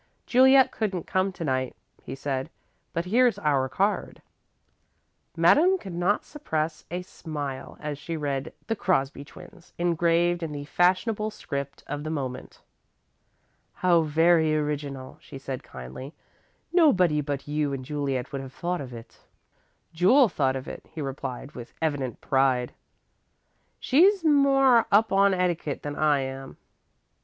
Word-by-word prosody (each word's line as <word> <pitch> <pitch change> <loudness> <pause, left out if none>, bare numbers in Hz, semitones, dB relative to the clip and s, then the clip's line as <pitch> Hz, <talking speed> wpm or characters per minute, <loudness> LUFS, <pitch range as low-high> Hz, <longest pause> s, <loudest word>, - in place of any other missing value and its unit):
"Juliet 260 +1 +5
couldn't 190 -6 -3
come 190 +1 0
to 170 - -6
night," 130 -2 -1 0.3
he 130 - -7
said, 135 +1 -3 0.4
"but 170 +1 -2
here's 235 +2 +3
our 140 -7 +1
card." 200 +9 -1 1.2
Madame 365 +5 +5
could 190 - -9
not 180 +4 0
repress 160 - -3
a 180 +1 -4
smile 145 -6 -6
as 150 -2 -5
she 165 +2 -5
read 140 -3 -3
"The 225 - -1
Crosby 140 -9 0
Twins" 175 +4 -15
engraved 175 0 +1
in 160 -2 -4
the 145 -1 -6
fashionable 190 +7 +1
script 140 -9 -6
of 145 +1 -5
the 155 - -4
moment. 130 -5 -5 1.1
"How 175 -2 +3
very 160 0 +3
original," 145 -3 -4
she 140 - -10
said, 135 -1 -6
kindly. 65 - -10 0.6
"Nobody 185 - +4
but 140 -1 -4
you 150 -1 -1
and 130 -2 -5
Juliet 140 -3 -3
would 140 -2 -4
have 135 -1 -10
thought 175 +2 -3
of 130 -3 -8
it." 115 0 -13 0.7
"Jule 210 - +5
thought 135 -6 0
of 130 0 -6
it," - - -8
he 160 - -9
replied, 135 0 -6
with 120 -4 -10
evident 145 -7 -2
pride. 130 -2 +1 1.1
"She's 360 +6 +4
more 270 -5 +5
up 215 +2 +4
on 195 0 +4
etiquette 175 -5 -1
than 145 0 -4
I 150 -2 +2
am." 135 0 -7
155 Hz, 140 wpm, -26 LUFS, 135-185 Hz, 1.2 s, Juliet